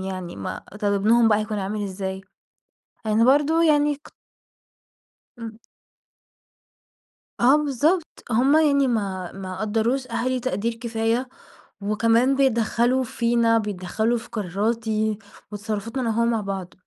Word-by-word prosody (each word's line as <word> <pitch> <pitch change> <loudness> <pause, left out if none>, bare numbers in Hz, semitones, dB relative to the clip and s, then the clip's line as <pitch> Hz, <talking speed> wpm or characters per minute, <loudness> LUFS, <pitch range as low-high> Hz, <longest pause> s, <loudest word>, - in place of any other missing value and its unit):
يعني 185 -2 -6
ما - - -6 0.2
طب 205 -1 +1
ابنهم 225 +3 +4
بقى 210 - +3
هيكون 215 -1 -3
عامل 205 +2 -3
إزاي؟ 190 0 -5 0.9
أنا 215 +2 +3
برضه 295 +5 +4
يعني 295 -2 +3
ك 290 - -17 1.3
امم. 225 -1 -8 1.8
آه 260 +5 +6
بالضبط، 300 +4 0
هُم 265 +7 +4
يعني 280 -3 +4
ما 195 -6 -2
ما 190 -1 -7
قدّروش 225 +5 0
أهلي 245 +2 -1
تقدير 230 -1 -2
كفاية 230 +1 -1 0.5
وكمان 230 +5 +2
بيتدخلوا 245 0 +2
فينا، 235 -1 +1
بيتدخلوا 210 +3 -1
في 225 - -10
قراراتي 215 +1 -1 0.3
وتصرفاتنا 215 +4 -4
أنا 235 - -1
وهو 230 +1 +1
مع 230 -2 +1
بعض. 195 -2 -5
230 Hz, 120 wpm, -23 LUFS, 205-255 Hz, 1.8 s, آه